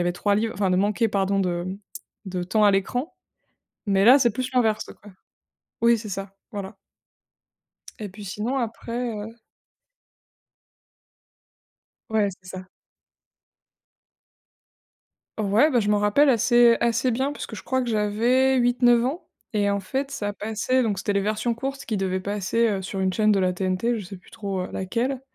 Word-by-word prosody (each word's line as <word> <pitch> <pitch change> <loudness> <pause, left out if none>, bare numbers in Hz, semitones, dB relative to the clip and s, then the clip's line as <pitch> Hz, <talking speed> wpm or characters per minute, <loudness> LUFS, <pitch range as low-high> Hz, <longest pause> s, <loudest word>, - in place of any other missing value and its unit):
avait 175 0 +1
3 200 +3 0
livres, 220 +2 -1
enfin 195 -2 0
de 180 - +2
manquer, 210 +4 +2
pardon, 195 -1 0
de 175 -2 -1 0.6
de 185 -2 -4
temps 210 +4 +1
à 205 - +6
l'écran, 245 - -2 0.7
mais 195 -1 +2
là, 255 +5 +8
c'est 240 -5 +3
plus 255 +4 -3
l'inverse, 220 -4 +1 0.2
quoi. 205 - -12 0.7
Oui, 235 0 +5
c'est 215 -1 -8
ça, 195 0 -6 0.2
voilà. 200 -1 -6 1.2
Et 210 - -5
puis, 205 +2 -11
sinon, 215 +7 -3
après, 235 0 -3
heu 220 +1 -7 2.7
Ouais, 215 -2 +2
c'est 185 - -13
ça. 185 0 -8 2.7
Ouais, 215 +8 +3
bah, 245 - +3
je 205 - -1
m'en 210 -1 +3
rappelle 210 +9 +3
assez 240 0 +5
assez 235 +2 +1
bien 265 +5 -1
puisque 240 - -7
je - - -9
crois 260 0 0
que 245 - -3
j'avais 235 +5 +2
8-9 240 -1 +3
ans 285 +8 -3 0.3
et 205 -1 +1
en 200 0 0
fait, 270 +8 -3
ça 205 -1 -3
passait 220 +5 0
donc 210 -4 -1
c'étaient 200 +1 -1
les 200 - +1
versions 215 +3 -1
courtes 270 +3 -5
qui 220 - -2
devaient 190 -1 -1
passer, 205 +4 0
heu, 200 -3 -1
sur 190 +1 -5
une 190 -1 0
chaîne 215 +1 +3
de 200 - +3
la 185 -1 +1
TNT, 185 +6 -1
je 200 - -8
sais 195 +2 -9
plus 180 - -21
trop, 200 -4 -4
heu, - - -6
laquelle 245 +8 -2
210 Hz, 170 wpm, -24 LUFS, 195-240 Hz, 2.7 s, là